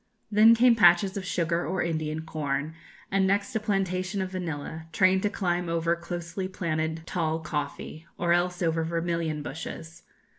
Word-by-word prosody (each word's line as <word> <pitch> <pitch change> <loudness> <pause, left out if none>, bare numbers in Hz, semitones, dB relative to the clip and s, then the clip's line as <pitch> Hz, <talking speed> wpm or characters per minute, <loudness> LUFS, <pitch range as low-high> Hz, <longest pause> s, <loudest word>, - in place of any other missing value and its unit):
Then 220 +2 +7
came 240 +1 +5
patches 190 -1 +5
of 195 -2 -4
sugar 170 -1 0
or 185 - -1
Indian 155 -2 -2
corn, 150 -1 -3 0.4
and 190 0 +3
next 200 +2 0
a - - +2
plantation 195 -2 -1
of 190 -1 -2
vanilla, 160 -3 -5
trained 185 +3 +3
to 205 - +1
climb 175 -3 -1
over 165 0 +1
closely 175 +2 -5
planted 160 -3 -2
tall 160 -3 -1
coffee, 155 0 -5
or 170 -1 +2
else 180 +1 0
over 165 -1 +1
vermilion 165 -2 -2
bushes. 160 +2 -7
170 Hz, 155 wpm, -27 LUFS, 160-190 Hz, 0.4 s, Then